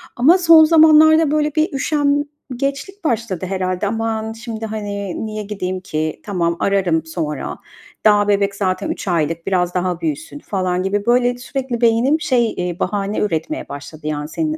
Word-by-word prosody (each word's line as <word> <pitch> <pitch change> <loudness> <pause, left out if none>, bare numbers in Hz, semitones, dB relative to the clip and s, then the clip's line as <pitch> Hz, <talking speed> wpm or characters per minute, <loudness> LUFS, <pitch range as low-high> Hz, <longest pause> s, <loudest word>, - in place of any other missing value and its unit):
ama 305 +10 +5
son 330 -3 +7
zamanlarda, 315 -1 +6
böyle, 300 0 0
bir 310 -1 +1
üşengeçlik 285 +4 -2
başladı 220 - -1
herhâlde. 185 +1 -2
"Aman, 225 0 -2
şimdi, 225 -1 -6
hani, 205 -2 -4
niye 215 -1 -5
gideyim 185 -2 -4
ki? 155 -3 -3
Tamam, 170 -4 -1
ararım 180 -5 +1
sonra. 155 -3 -4 0.5
Daha 205 -1 +5
bebek 200 -1 +1
zaten 195 +10 -1
3 275 - -5
aylık, 165 0 -1
biraz 180 -2 +1
daha 180 -1 -1
büyüsün." 160 - -4
falan 185 -6 -2
gibi, 200 +1 -1
böyle, 245 0 +2
sürekli 250 -1 -4
beynim, 240 +7 +3
şey, 240 -6 +1
eee, 180 -1 -3
bahane 200 +1 -1
üretmeye 210 - -2
başladı, 150 +2 -8
yani, 150 0 -3
senin 315 -1 -2
210 Hz, 150 wpm, -19 LUFS, 180-275 Hz, 0.5 s, son